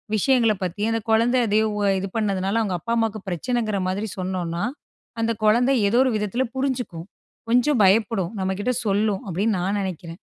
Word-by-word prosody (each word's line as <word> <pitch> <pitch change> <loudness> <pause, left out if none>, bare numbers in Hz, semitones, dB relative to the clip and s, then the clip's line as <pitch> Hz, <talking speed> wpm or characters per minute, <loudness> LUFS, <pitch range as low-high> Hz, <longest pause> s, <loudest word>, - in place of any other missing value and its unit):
விஷயங்களப் 225 -3 +2
பத்தி 185 +3 -4
அந்த 225 - -1
கொழந்தை 235 +3 +3
அத 205 - 0 0.4
இது 195 - -3
பண்ணதுனால 200 0 0
அவங்க 195 -4 -1
அப்பா 230 +7 -3
அம்மாக்கு 220 -2 -1
பிரச்சனைன்கிற 215 +2 -1
மாரி 200 +3 -2
சொன்னோம்னா, 180 -1 -3 0.6
அந்த 230 0 +1
கொழந்த 240 +5 +4 0.2
ஏதோ 235 +4 +3
ஒரு 255 - +2
விதத்ல 210 +5 -1
புரிஞ்சுக்கும். 245 -11 -3 0.4
கொஞ்சம் 245 0 +3
பயப்படும், 195 -1 +2
நம்மக்கிட்ட 190 +6 -1
சொல்லும். 205 0 +1
அப்டினு 200 +5 0
நான் 195 +3 -1
நெனைக்கிறேன். 170 -2 -6
210 Hz, 150 wpm, -23 LUFS, 190-230 Hz, 0.6 s, கொழந்த